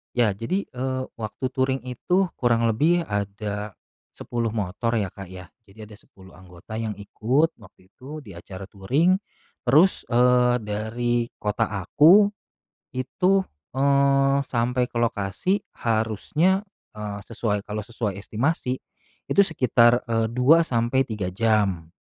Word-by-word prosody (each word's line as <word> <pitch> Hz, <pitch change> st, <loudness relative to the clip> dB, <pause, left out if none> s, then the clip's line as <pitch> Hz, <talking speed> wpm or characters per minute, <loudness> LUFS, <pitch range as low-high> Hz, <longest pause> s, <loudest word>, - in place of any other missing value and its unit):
Ya 120 Hz, -4 st, +3 dB
jadi, 115 Hz, -, -2 dB
eee, 130 Hz, +1 st, -2 dB, 0.2 s
waktu 110 Hz, +4 st, -5 dB
touring 130 Hz, 0 st, 0 dB
itu 180 Hz, +9 st, 0 dB
kurang 115 Hz, -2 st, +2 dB
lebih 165 Hz, +10 st, +2 dB
ada, 105 Hz, -, -4 dB, 0.4 s
10 120 Hz, -1 st, -3 dB
motor 110 Hz, +3 st, -1 dB
ya 100 Hz, -4 st, -1 dB
Kak 100 Hz, -2 st, -10 dB
ya. 90 Hz, 0 st, -11 dB, 0.2 s
Jadi, 105 Hz, +3 st, -13 dB
ada 105 Hz, -, -13 dB
10 95 Hz, -1 st, -18 dB
anggota 95 Hz, +4 st, -10 dB
yang 110 Hz, -2 st, -3 dB
ikut, 120 Hz, +10 st, 0 dB
waktu 95 Hz, -2 st, -19 dB
itu, 145 Hz, +6 st, -10 dB
di 105 Hz, -, -12 dB
acara 95 Hz, +2 st, -9 dB
touring 135 Hz, -, +1 dB, 0.5 s
terus, 155 Hz, +10 st, +4 dB
eee, 125 Hz, 0 st, +4 dB
dari 115 Hz, +3 st, -1 dB
kota 105 Hz, +2 st, -1 dB, 0.2 s
aku, 190 Hz, -, +6 dB, 0.6 s
itu, 180 Hz, +9 st, +1 dB, 0.3 s
eee, 140 Hz, 0 st, +3 dB
sampai 125 Hz, +1 st, 0 dB
ke -, -, -30 dB
lokasi 115 Hz, -, 0 dB, 0.2 s
harusnya, 115 Hz, -, 0 dB, 0.3 s
eee, 105 Hz, -1 st, -5 dB
sesuai 105 Hz, -3 st, -2 dB
kalau 105 Hz, 0 st, -4 dB
sesuai 110 Hz, -1 st, -4 dB
estimasi, 125 Hz, -, -2 dB, 0.5 s
itu 200 Hz, -, +4 dB
sekitar, 125 Hz, -8 st, +3 dB
eee, 115 Hz, -1 st, 0 dB
2 130 Hz, +8 st, +5 dB
sampai 120 Hz, -2 st, +1 dB
3 105 Hz, -7 st, -5 dB
jam. 100 Hz, -6 st, +1 dB
115 Hz, 130 wpm, -24 LUFS, 105-135 Hz, 0.6 s, aku